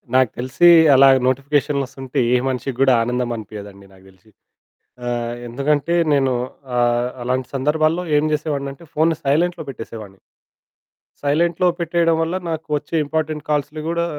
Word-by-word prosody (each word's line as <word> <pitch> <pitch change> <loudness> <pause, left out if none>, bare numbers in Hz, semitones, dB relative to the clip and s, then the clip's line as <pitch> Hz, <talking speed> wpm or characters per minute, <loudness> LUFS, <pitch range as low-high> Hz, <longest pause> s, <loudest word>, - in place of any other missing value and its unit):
నాకు 130 -3 +4
తెలిసీ 130 +8 +2 0.3
అలాగా 135 0 +6
నోటిఫికేషన్లు 140 +1 0
ఓస్తుంటే, 135 -1 -5
ఏ - - +5
మనిషికి 130 0 -3
కూడా 135 -1 +5
ఆనందం 125 0 -2
అనిపియదండి 100 -2 -10
నాకు 95 0 -20
తెలిసి. 95 +3 -24 0.8
ఆ! - - -3 0.4
ఎందుకంటే 145 +6 0 0.2
నేను 135 -2 +2 0.4
ఆహ్, 120 0 +1
అలాంటి 130 +1 -1
సందర్భాల్లో 155 +5 +1
ఏం 150 - +2
చేసేవాడిని 145 -2 -2
అంటే, 165 +5 -16
ఫోను 160 +1 +2
సైలెంట్‌లో 170 +6 +1
పెట్టేసేవాడిని. 110 -6 -9 1.0
సైలెంట్‌లో 170 +5 +1
పెట్టేయడం 170 0 +1
వల్ల, 165 +3 -1
నాకు 160 0 -4
వచ్చే 150 +3 -6
ఇంపార్టెంట్ 155 0 -3
కాల్సులు 150 +1 -1
గూడా 170 0 0
140 Hz, 135 wpm, -20 LUFS, 125-160 Hz, 1.0 s, అలాగా